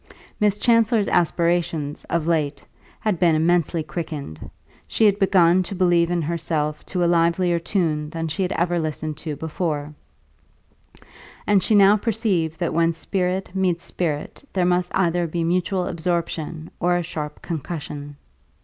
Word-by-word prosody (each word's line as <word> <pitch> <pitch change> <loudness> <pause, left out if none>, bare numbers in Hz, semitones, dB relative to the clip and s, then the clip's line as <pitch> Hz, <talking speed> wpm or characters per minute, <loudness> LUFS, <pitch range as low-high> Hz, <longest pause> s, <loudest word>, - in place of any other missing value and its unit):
Miss 210 -2 +2
Chancellor's 230 -2 +3
aspirations, 170 -3 0
of 170 -2 -1
late, 150 -4 -1 0.4
had 210 -6 0
been 170 -3 +4
immensely 165 0 +1
quickened; 155 - -6 0.4
she 220 - +2
had 205 -1 +4
begun 185 -2 +4
to 185 +2 -5
believe 175 -2 +3
in 175 -2 0
herself 155 -2 -2
to 180 -2 -1
a - - +3
livelier 170 +1 +2
tune 160 -4 -1
than 165 +1 -4
she 160 +5 -3
had 185 0 0
ever 175 +1 0
listened 155 -1 -3
to 155 -2 -5
before; 155 -2 -3 1.5
and 205 -2 +4
she 215 - +2
now 200 +1 +6
perceived 200 -8 -1
that 170 -3 -1
when 165 +1 +2
spirit 185 +2 -1
meets 180 -3 0
spirit 155 - -3
there 185 -2 +1
must 180 0 +1
either 175 -2 +1
be 165 +1 -2
mutual 180 +2 0
absorption 165 -2 -3
or 175 0 +2
a 175 - -1
sharp 150 -2 -5
concussion. 145 -3 -5
170 Hz, 150 wpm, -22 LUFS, 160-185 Hz, 1.5 s, now